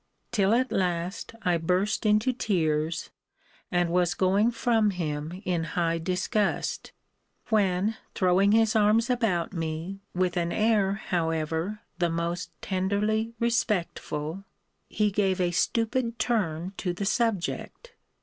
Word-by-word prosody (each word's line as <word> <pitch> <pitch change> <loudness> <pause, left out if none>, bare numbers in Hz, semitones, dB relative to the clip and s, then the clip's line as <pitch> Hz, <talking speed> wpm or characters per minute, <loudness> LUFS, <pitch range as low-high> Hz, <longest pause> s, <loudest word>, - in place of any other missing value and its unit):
till 200 -4 +2
at 250 +3 +2
last 180 +3 -1
I 180 -2 +2
burst 185 +6 0
into 215 +5 +3
tears, 160 -8 -1 0.6
and 175 -1 +1
was 175 +1 +2
going 195 +4 +3
from 230 -2 +2
him 165 0 -4
in 175 -3 0
high 165 -1 +1
disgust: 185 +5 -1 0.6
when, 205 0 +2 0.2
throwing 190 +2 +3
his 225 0 +3
arms 220 +3 +4
about 205 -9 0
me, 165 +3 -4 0.2
with 180 0 0
an 170 0 0
air, 215 -3 +2
however, 165 +1 -2 0.2
the 175 -1 +2
most 170 +2 -2
tenderly 210 +4 0
respectful, 175 -7 -1 0.5
he 210 -1 +1
gave 195 -2 +1
a 175 -1 +1
stupid 230 +5 0
turn 185 -7 -1
to 180 -3 -2
the 195 +3 -4
subject. 230 - -1
190 Hz, 120 wpm, -27 LUFS, 170-215 Hz, 0.6 s, arms